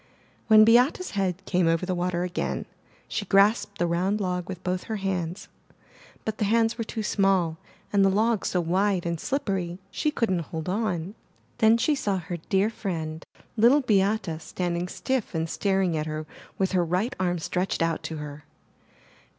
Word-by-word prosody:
When 215 Hz, -1 st, +8 dB
Beate' 245 Hz, +8 st, +5 dB
s 365 Hz, -, -6 dB
head 190 Hz, -2 st, -2 dB
came 180 Hz, -2 st, +2 dB
over 165 Hz, +2 st, +2 dB
the 185 Hz, -, -1 dB
water 175 Hz, 0 st, -1 dB
again 180 Hz, -1 st, -2 dB, 0.4 s
she -, -, -2 dB
grasped 200 Hz, +1 st, +3 dB
the 175 Hz, -, +1 dB
round 180 Hz, +5 st, 0 dB
log 180 Hz, -2 st, -2 dB
with 185 Hz, -1 st, -6 dB
both 180 Hz, 0 st, -2 dB
her 220 Hz, -, -3 dB
hands, 185 Hz, -3 st, -3 dB, 0.8 s
but 220 Hz, -1 st, -3 dB
the 210 Hz, -, +2 dB
hands 225 Hz, +2 st, +2 dB
were 230 Hz, -, -3 dB
too 220 Hz, 0 st, -4 dB
small 190 Hz, -6 st, +1 dB, 0.3 s
and 200 Hz, -1 st, +5 dB
the 195 Hz, -, +5 dB
log 215 Hz, +2 st, +2 dB
so 180 Hz, -, 0 dB
wide 185 Hz, +2 st, +1 dB
and 170 Hz, -1 st, -2 dB
slippery, 190 Hz, -, -2 dB
she 300 Hz, -, 0 dB
couldn't 225 Hz, -, 0 dB
hold 160 Hz, 0 st, -5 dB
on. 185 Hz, -3 st, -1 dB, 0.5 s
Then 225 Hz, 0 st, +6 dB
she 300 Hz, +6 st, +2 dB
saw 205 Hz, -9 st, 0 dB
her 175 Hz, 0 st, -5 dB
dear 195 Hz, +6 st, +1 dB
friend. 165 Hz, -7 st, -4 dB, 0.3 s
Little 240 Hz, +6 st, +5 dB
Beate, 200 Hz, -, +1 dB
standing 175 Hz, +1 st, -2 dB
stiff 255 Hz, 0 st, -2 dB
and 160 Hz, 0 st, 0 dB
staring 190 Hz, -1 st, 0 dB
at 155 Hz, 0 st, -2 dB
her 155 Hz, 0 st, -4 dB, 0.3 s
with 190 Hz, -1 st, +1 dB
her 180 Hz, -2 st, +2 dB
right 185 Hz, +10 st, -1 dB
arm 180 Hz, -1 st, +1 dB
stretched 180 Hz, +1 st, -1 dB
out 165 Hz, 0 st, 0 dB
to 160 Hz, -, -5 dB
her. 150 Hz, 0 st, -8 dB
190 Hz, 175 wpm, -26 LUFS, 175-215 Hz, 0.8 s, When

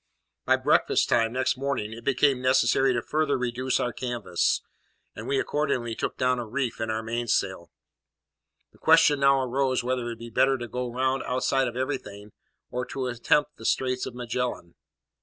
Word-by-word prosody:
By -, -, +4 dB
breakfast -, -, +2 dB
time 115 Hz, -1 st, +2 dB
next 130 Hz, +1 st, +1 dB
morning 135 Hz, -6 st, -2 dB
it 115 Hz, +1 st, -10 dB
became 135 Hz, 0 st, +2 dB
necessary 130 Hz, +1 st, +3 dB
to 120 Hz, -1 st, -1 dB
further 155 Hz, -1 st, 0 dB
reduce 125 Hz, +1 st, -1 dB
our 120 Hz, -, -1 dB
canvas, 120 Hz, -8 st, -1 dB, 0.5 s
and -, -, -7 dB
we 140 Hz, -, +1 dB
accordingly 135 Hz, -6 st, -1 dB
took -, -, -4 dB
down 125 Hz, 0 st, +1 dB
a 120 Hz, -, -5 dB
reef 125 Hz, 0 st, -3 dB
in 110 Hz, -, -2 dB
our 110 Hz, 0 st, -2 dB
mainsail. 110 Hz, -6 st, -1 dB, 1.0 s
The -, -, -24 dB
question 145 Hz, -1 st, +5 dB
now 140 Hz, 0 st, +4 dB
arose 130 Hz, 0 st, 0 dB
whether 125 Hz, +1 st, -1 dB
it -, -, -5 dB
would 120 Hz, -1 st, -5 dB
be 115 Hz, 0 st, -9 dB
better 135 Hz, +4 st, +3 dB
to 120 Hz, -1 st, -6 dB
go 125 Hz, +1 st, -4 dB
round 130 Hz, +2 st, 0 dB
outside 130 Hz, +1 st, 0 dB
of 120 Hz, 0 st, -5 dB
everything, 125 Hz, -6 st, -4 dB, 0.4 s
or 125 Hz, 0 st, -2 dB
to 135 Hz, -1 st, -4 dB
attempt 145 Hz, +5 st, +1 dB
the -, -, -12 dB
Straits 130 Hz, +1 st, 0 dB
of 120 Hz, -, -8 dB
Magellan. 120 Hz, -7 st, -3 dB
125 Hz, 175 wpm, -26 LUFS, 115-135 Hz, 1.0 s, question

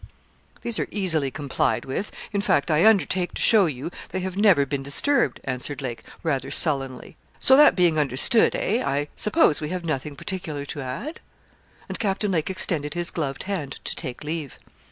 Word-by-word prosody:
'These 235 Hz, -2 st, +1 dB
are -, -, -1 dB
easily 160 Hz, -9 st, +1 dB
complied 140 Hz, 0 st, -1 dB
with 135 Hz, +10 st, -4 dB, 0.2 s
in 200 Hz, -, 0 dB
fact 160 Hz, -5 st, +1 dB
I 155 Hz, +7 st, +4 dB
undertake 190 Hz, -4 st, +2 dB
to -, -, -3 dB
show 210 Hz, -5 st, +5 dB
you 145 Hz, +2 st, -5 dB, 0.2 s
they 185 Hz, -, -4 dB
have 185 Hz, 0 st, -4 dB
never 195 Hz, -8 st, +4 dB
been 140 Hz, 0 st, -3 dB
disturbed,' 140 Hz, -, +1 dB
answered 135 Hz, +2 st, -4 dB
Lake, 125 Hz, -4 st, -5 dB, 0.2 s
rather 135 Hz, -5 st, -1 dB
sullenly. 135 Hz, -4 st, +1 dB, 0.2 s
'So 265 Hz, -, +5 dB
that 295 Hz, +2 st, +7 dB
being 175 Hz, -4 st, +3 dB
understood 145 Hz, -, +4 dB
eh? 230 Hz, +5 st, 0 dB
I 145 Hz, +1 st, -1 dB
suppose 210 Hz, -, +2 dB
we 150 Hz, -, -4 dB
have 180 Hz, -1 st, -4 dB
nothing 150 Hz, -2 st, -3 dB
particular 155 Hz, -3 st, -5 dB
to 145 Hz, -, -6 dB
add?' 135 Hz, -, -6 dB, 0.7 s
And -, -, -5 dB
Captain 205 Hz, -1 st, -1 dB
Lake 165 Hz, -2 st, -1 dB
extended 165 Hz, -5 st, -1 dB
his 175 Hz, 0 st, -1 dB
gloved 140 Hz, -5 st, -3 dB
hand 170 Hz, -9 st, -4 dB
to -, -, 0 dB
take 125 Hz, +1 st, -6 dB
leave. 150 Hz, -2 st, -5 dB
155 Hz, 175 wpm, -24 LUFS, 140-190 Hz, 0.7 s, that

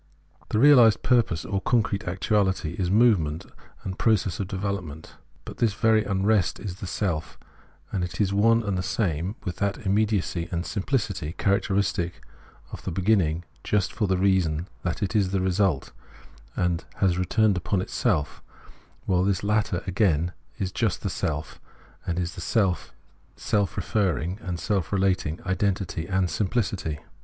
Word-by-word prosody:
The -, -, 0 dB
realised 125 Hz, -4 st, +6 dB
purpose, 115 Hz, -10 st, +2 dB
or 100 Hz, -1 st, -2 dB
concrete 110 Hz, -4 st, +1 dB
actuality, 95 Hz, -1 st, 0 dB
is 90 Hz, -2 st, 0 dB
movement 95 Hz, -8 st, +3 dB, 0.4 s
and 95 Hz, 0 st, -5 dB
process 105 Hz, -6 st, +2 dB
of 100 Hz, -, -2 dB
development. 95 Hz, -6 st, -4 dB, 0.3 s
But -, -, -8 dB
this 110 Hz, -4 st, +1 dB
very 110 Hz, -1 st, +3 dB
unrest 100 Hz, -1 st, +1 dB
is 95 Hz, -3 st, -6 dB
the 100 Hz, -, -6 dB
self; 85 Hz, -6 st, -2 dB, 0.5 s
and 95 Hz, -, -1 dB
it 90 Hz, -, -5 dB
is 100 Hz, -2 st, +1 dB
one 115 Hz, +3 st, +4 dB
and 100 Hz, -2 st, -1 dB
the -, -, 0 dB
same 90 Hz, -1 st, -1 dB
with 90 Hz, -4 st, -4 dB
that 100 Hz, +1 st, -2 dB
immediacy 100 Hz, -4 st, 0 dB
and 85 Hz, -1 st, -1 dB
simphcity 100 Hz, -, -2 dB
character 100 Hz, -1 st, +1 dB
istic 90 Hz, -3 st, 0 dB, 0.6 s
of -, -, -8 dB
the -, -, -3 dB
beginning 90 Hz, -3 st, +1 dB, 0.2 s
just 100 Hz, -3 st, 0 dB
for 105 Hz, -, 0 dB
the 95 Hz, -1 st, +1 dB
reason 90 Hz, -4 st, +2 dB, 0.2 s
thai 85 Hz, -, -1 dB
it 100 Hz, -, -2 dB
is 100 Hz, -3 st, +3 dB
the 95 Hz, 0 st, 0 dB
result, 95 Hz, -4 st, +1 dB, 0.6 s
and 90 Hz, -1 st, 0 dB
has 90 Hz, -3 st, +1 dB
returned 105 Hz, +3 st, +2 dB
upon 90 Hz, +2 st, -1 dB
itself 75 Hz, -4 st, -1 dB, 0.3 s
— -, -, -31 dB
while 90 Hz, -1 st, +2 dB
this 95 Hz, -1 st, 0 dB
latter 105 Hz, -3 st, 0 dB
again 90 Hz, -3 st, +1 dB, 0.2 s
is 95 Hz, -2 st, -2 dB
just 105 Hz, -6 st, -1 dB
the -, -, -1 dB
self, 75 Hz, 0 st, -3 dB, 0.5 s
and 85 Hz, -1 st, -1 dB
the 90 Hz, -, 0 dB, 0.2 s
self 95 Hz, 0 st, 0 dB, 0.5 s
is -, -, -14 dB
self 100 Hz, -2 st, 0 dB
referring 95 Hz, -2 st, 0 dB
and 90 Hz, -2 st, -4 dB
self 95 Hz, 0 st, -1 dB
relating 95 Hz, -5 st, +1 dB
identity 95 Hz, -2 st, -1 dB
and 95 Hz, -1 st, +1 dB
simphcity. 95 Hz, -7 st, -1 dB
95 Hz, 155 wpm, -25 LUFS, 90-105 Hz, 0.6 s, realised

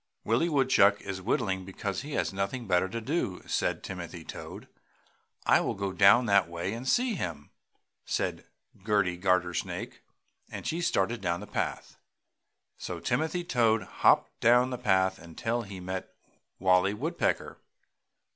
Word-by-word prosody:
"Willie 120 Hz, +10 st, +2 dB
Woodchuck 130 Hz, -9 st, +4 dB
is 95 Hz, -1 st, -5 dB
whittling 95 Hz, -2 st, 0 dB
because 95 Hz, +2 st, -4 dB
he 145 Hz, +2 st, -7 dB
has -, -, -1 dB
nothing 100 Hz, +6 st, -3 dB
better 95 Hz, -1 st, +2 dB
to 115 Hz, -, -4 dB
do!" 115 Hz, -, -2 dB
said -, -, -1 dB
Timothy -, -, -7 dB
Toad. -, -, -8 dB, 0.8 s
"I -, -, +5 dB
will -, -, -2 dB
go 100 Hz, -1 st, -3 dB
down 100 Hz, +6 st, +6 dB
that 100 Hz, -5 st, +3 dB
way 85 Hz, +4 st, -3 dB
and 120 Hz, +3 st, -4 dB
see 245 Hz, -1 st, +2 dB
him!" 85 Hz, -, -5 dB, 0.5 s
said -, -, -2 dB, 0.4 s
Gerty 100 Hz, -4 st, +1 dB
Gartersnake, 90 Hz, -1 st, -1 dB, 0.5 s
and -, -, -7 dB
she 165 Hz, +2 st, -1 dB
started 115 Hz, -, 0 dB
down 85 Hz, 0 st, -1 dB
the 105 Hz, -, -8 dB
path. -, -, -4 dB, 0.8 s
So -, -, -5 dB
Timothy 160 Hz, +7 st, -1 dB
Toad 115 Hz, -8 st, +2 dB, 0.2 s
hopped -, -, +4 dB
down 125 Hz, +2 st, +4 dB
the 125 Hz, -, -4 dB
path 95 Hz, -1 st, +2 dB
until 110 Hz, +8 st, -3 dB
he 100 Hz, -4 st, -8 dB
met 95 Hz, +1 st, -5 dB, 0.5 s
Wallie 95 Hz, +2 st, +3 dB
Woodpecker. 160 Hz, +10 st, -2 dB
100 Hz, 145 wpm, -29 LUFS, 95-120 Hz, 0.8 s, down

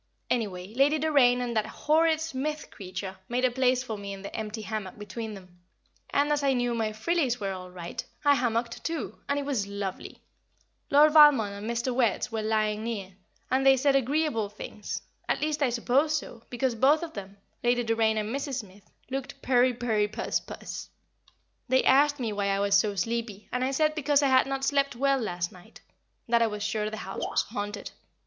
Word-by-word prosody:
Anyway, 200 Hz, -4 st, -2 dB
Lady 280 Hz, +5 st, +3 dB
Doraine 275 Hz, -5 st, +4 dB
and 240 Hz, -1 st, -3 dB
that 215 Hz, -, +1 dB
horrid 315 Hz, +1 st, +2 dB
Smith 305 Hz, -1 st, -4 dB
creature 190 Hz, 0 st, -6 dB
made 250 Hz, +1 st, +1 dB
a 255 Hz, -, +2 dB
place 255 Hz, 0 st, +2 dB
for 220 Hz, -5 st, -5 dB
me 200 Hz, 0 st, -6 dB
in 195 Hz, 0 st, -9 dB
the 200 Hz, -, -7 dB
empty 220 Hz, 0 st, -4 dB
hammock 215 Hz, -3 st, -5 dB
between 210 Hz, +1 st, -6 dB
them, 180 Hz, -2 st, -15 dB, 0.5 s
and, 290 Hz, +1 st, +2 dB
as 295 Hz, -1 st, +2 dB
I 275 Hz, -1 st, +2 dB
knew 245 Hz, -1 st, 0 dB
my 225 Hz, -2 st, -1 dB
"frillies" 250 Hz, +3 st, 0 dB
were 200 Hz, -2 st, -2 dB
all 185 Hz, -1 st, -7 dB
right, 175 Hz, -1 st, -6 dB, 0.2 s
I 285 Hz, -, +7 dB
hammocked 235 Hz, -2 st, -1 dB
too, 330 Hz, -1 st, -4 dB
and 280 Hz, -, +1 dB
it 285 Hz, -, -2 dB
was 250 Hz, -8 st, -1 dB
lovely. 200 Hz, -2 st, -5 dB, 0.7 s
Lord 300 Hz, +2 st, +6 dB
Valmond 285 Hz, -10 st, +7 dB
and 205 Hz, +3 st, -6 dB
Mr. 235 Hz, +2 st, -1 dB
Wertz 240 Hz, -3 st, +1 dB
were 220 Hz, -1 st, -2 dB
lying 215 Hz, 0 st, 0 dB
near, 205 Hz, -5 st, -4 dB, 0.4 s
and 260 Hz, +1 st, +3 dB
they 270 Hz, 0 st, +6 dB
said 275 Hz, +1 st, +3 dB
agreeable 270 Hz, -5 st, +1 dB
things, 210 Hz, 0 st, -7 dB, 0.3 s
at -, -, +1 dB
least 305 Hz, 0 st, -1 dB
I 275 Hz, -, +3 dB
suppose 265 Hz, +6 st, +2 dB
so, 235 Hz, -6 st, -8 dB
because 245 Hz, +1 st, 0 dB
both 275 Hz, +8 st, +3 dB
of 330 Hz, -, -6 dB
them 200 Hz, -1 st, -8 dB, 0.3 s
Lady 245 Hz, 0 st, +2 dB
Doraine 225 Hz, -1 st, +2 dB
and 215 Hz, +3 st, -2 dB
Mrs. 280 Hz, -1 st, -3 dB
Smith 205 Hz, -5 st, -9 dB, 0.2 s
looked 275 Hz, +1 st, -5 dB
purry 250 Hz, 0 st, +4 dB
purry 230 Hz, -4 st, 0 dB
puss 210 Hz, -, -2 dB
puss. -, -, -8 dB, 0.8 s
They 260 Hz, +1 st, +4 dB
asked 290 Hz, +1 st, +4 dB
me 225 Hz, -4 st, -2 dB
why 200 Hz, -1 st, -1 dB
I 195 Hz, 0 st, +1 dB
was 200 Hz, 0 st, +1 dB
so 200 Hz, 0 st, +3 dB
sleepy, 225 Hz, 0 st, -3 dB
and 250 Hz, 0 st, -1 dB
I 260 Hz, -, +1 dB
said 305 Hz, +3 st, +2 dB
because 290 Hz, -1 st, +2 dB
I 275 Hz, -, +3 dB
had 260 Hz, 0 st, +4 dB
not 270 Hz, 0 st, -3 dB
slept 280 Hz, -1 st, +1 dB
well 275 Hz, +2 st, +2 dB
the 230 Hz, -, -2 dB
last 175 Hz, -2 st, -3 dB
night 185 Hz, +5 st, -16 dB, 0.5 s
that 235 Hz, 0 st, +3 dB
I 230 Hz, -, +4 dB
was 210 Hz, -1 st, -4 dB
sure 215 Hz, 0 st, -1 dB
the 220 Hz, -, -6 dB
house 195 Hz, -2 st, -6 dB
was -, -, 0 dB
haunted. 205 Hz, -2 st, -5 dB
235 Hz, 200 wpm, -28 LUFS, 210-275 Hz, 0.8 s, I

